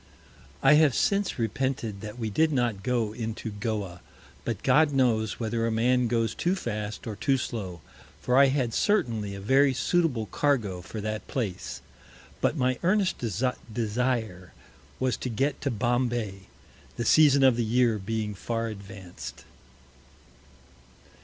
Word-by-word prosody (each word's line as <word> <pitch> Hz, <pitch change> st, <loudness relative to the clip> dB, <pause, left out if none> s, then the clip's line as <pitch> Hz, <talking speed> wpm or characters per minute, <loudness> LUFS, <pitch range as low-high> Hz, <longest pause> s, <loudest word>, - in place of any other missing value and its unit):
I 135 Hz, -, +7 dB
have 145 Hz, -5 st, +4 dB
since 200 Hz, -1 st, +1 dB
repented 115 Hz, -2 st, -2 dB
that 105 Hz, +1 st, -7 dB
we 110 Hz, -3 st, -3 dB
did 160 Hz, +8 st, +2 dB
not 120 Hz, -7 st, 0 dB
go 115 Hz, -2 st, 0 dB
into 110 Hz, -1 st, -5 dB
Goa; 100 Hz, -4 st, -4 dB, 0.4 s
but -, -, -4 dB
God 155 Hz, -1 st, +4 dB
knows 115 Hz, -5 st, +1 dB
whether 115 Hz, 0 st, -1 dB
a -, -, 0 dB
Man 125 Hz, +2 st, +2 dB
goes 115 Hz, -1 st, 0 dB
too 175 Hz, +3 st, 0 dB
fast 105 Hz, -, -4 dB
or 110 Hz, -, -4 dB
too 135 Hz, +6 st, +1 dB
slow; 95 Hz, -10 st, -5 dB, 0.4 s
for 125 Hz, -, 0 dB
I 140 Hz, +1 st, +7 dB
had 130 Hz, -4 st, 0 dB
certainly 115 Hz, -, 0 dB
a -, -, -7 dB
very 135 Hz, +6 st, +3 dB
suitable 140 Hz, -5 st, +1 dB
Cargo 110 Hz, -8 st, 0 dB
for 105 Hz, +4 st, -7 dB
that 110 Hz, +1 st, -4 dB
Place; 110 Hz, -9 st, -4 dB, 0.6 s
But 155 Hz, -, +1 dB
my 130 Hz, -1 st, +1 dB
earnest 190 Hz, +1 st, +1 dB
Desire 115 Hz, -3 st, -2 dB, 0.5 s
was 130 Hz, -3 st, 0 dB
to 125 Hz, -, -4 dB
get 135 Hz, +5 st, -1 dB
to 140 Hz, -, 0 dB
Bombay, 120 Hz, -4 st, -1 dB, 0.5 s
the 120 Hz, -, -2 dB
Season 140 Hz, +1 st, +6 dB
of 130 Hz, -2 st, +6 dB
the 120 Hz, -, 0 dB
Year 115 Hz, -1 st, +2 dB
being 105 Hz, +1 st, -3 dB
far 115 Hz, +3 st, -3 dB
advanc'd. 100 Hz, -3 st, -9 dB
115 Hz, 145 wpm, -27 LUFS, 105-130 Hz, 0.6 s, I